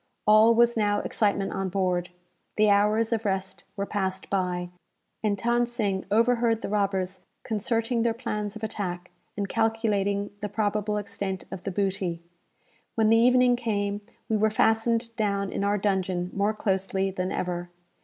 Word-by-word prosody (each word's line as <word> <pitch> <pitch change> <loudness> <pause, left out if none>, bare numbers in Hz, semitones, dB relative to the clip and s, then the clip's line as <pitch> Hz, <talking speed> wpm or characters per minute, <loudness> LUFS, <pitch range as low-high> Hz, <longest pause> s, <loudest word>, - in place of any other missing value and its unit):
All 215 +2 +6
was 235 0 +4
now 205 -2 +2
excitement 200 -2 0
on 195 -1 -2
board. 180 -2 0 0.5
The 210 -1 +4
hours 215 +3 +3
of 225 -1 -1
rest 190 -2 -3
were 200 -1 -2
passed 190 -2 -3
by, 180 -2 -1 0.5
and 210 -2 0
Than 240 +3 +1
Sing 205 -6 -1
overheard 230 +1 +2
the - - -3
robbers 195 -2 -1 0.2
concerting 225 +2 0
their 230 -1 +1
plans 210 -3 -3
of 220 - -9
attack, 185 -5 -4 0.3
and 200 -1 -1
calculating 210 -3 0
the 210 - -3
probable 210 0 -1
extent 195 -2 -3
of 180 - -7
the 195 - -2
booty. 190 -3 -1 0.8
When 220 -1 +3
the 225 - +6
evening 250 +1 +5
came, 205 -3 -2 0.3
we 220 - +1
were 215 +1 +3
fastened 230 +2 +1
down 200 -2 0
in - - -2
our 205 +1 +2
dungeon 185 -3 -1
more 205 +2 +1
closely 195 -1 0
than 185 0 -3
ever. 175 -1 -3
205 Hz, 155 wpm, -26 LUFS, 195-225 Hz, 0.8 s, All